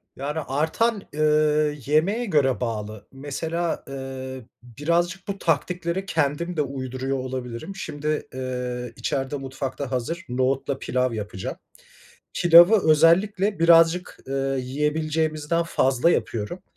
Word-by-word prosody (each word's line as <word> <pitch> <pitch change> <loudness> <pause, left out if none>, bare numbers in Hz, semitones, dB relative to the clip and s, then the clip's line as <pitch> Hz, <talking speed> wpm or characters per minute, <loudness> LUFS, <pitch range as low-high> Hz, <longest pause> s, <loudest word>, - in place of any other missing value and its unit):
Yani, 145 +4 -3
artan 190 - 0
eee, 150 0 +2
yemeğe 185 - +2
göre 140 - +2
bağlı. 110 -2 -4
Mesela 160 +5 -3
eee, 130 -2 -7 0.2
birazcık 170 - -1
bu 200 0 -3
taktikleri 170 +3 -1
kendim 165 +2 -1
de 150 - +3
uyduruyor 130 -1 -3
olabilirim. 130 +5 -5
Şimdi 150 -4 -3
eee, 125 -1 -4
içeride 135 +1 -2
mutfakta 135 0 -5
hazır, 165 +8 -3
nohutla 130 +2 0
pilav 125 -1 0
yapacağım. 105 -4 -5 0.8
Pilavı 175 +2 +7
özellikle 190 +6 +3
birazcık 165 +1 +4
eee, 135 - -4 0.3
yiyebileceğimizden 155 +4 -1
fazla 135 -2 +2
yapıyorum 115 - -2
150 Hz, 105 wpm, -24 LUFS, 130-170 Hz, 0.8 s, Pilavı